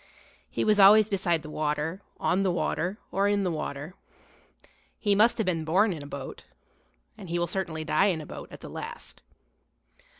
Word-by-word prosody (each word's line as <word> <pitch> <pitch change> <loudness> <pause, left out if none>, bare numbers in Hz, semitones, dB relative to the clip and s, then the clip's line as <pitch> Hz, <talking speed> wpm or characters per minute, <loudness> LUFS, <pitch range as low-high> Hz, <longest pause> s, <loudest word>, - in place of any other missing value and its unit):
He - - -1
was 210 -1 +3
always 210 +2 +7
beside 175 -5 +1
the 155 - -8
water, 155 +4 -2 0.2
on 185 +2 +1
the 195 - +2
water, 180 +2 -1
or 200 +1 +2
in 205 -1 +1
the 180 - 0
water. 155 +1 -5 1.0
He 205 -2 +1
must 215 +4 +4
have 220 - 0
been 170 -3 0
born 190 +6 +3
in 155 - -7
a - - -9
boat, 140 -2 -7 0.8
and 185 - -9
he 170 - -1
will 175 - +1
certainly 170 -3 -3
die 155 +4 +3
in 175 -5 0
a 155 - -7
boat - - -9
at - - -11
the - - -8
last. 475 +1 -8
180 Hz, 190 wpm, -27 LUFS, 160-200 Hz, 1.0 s, always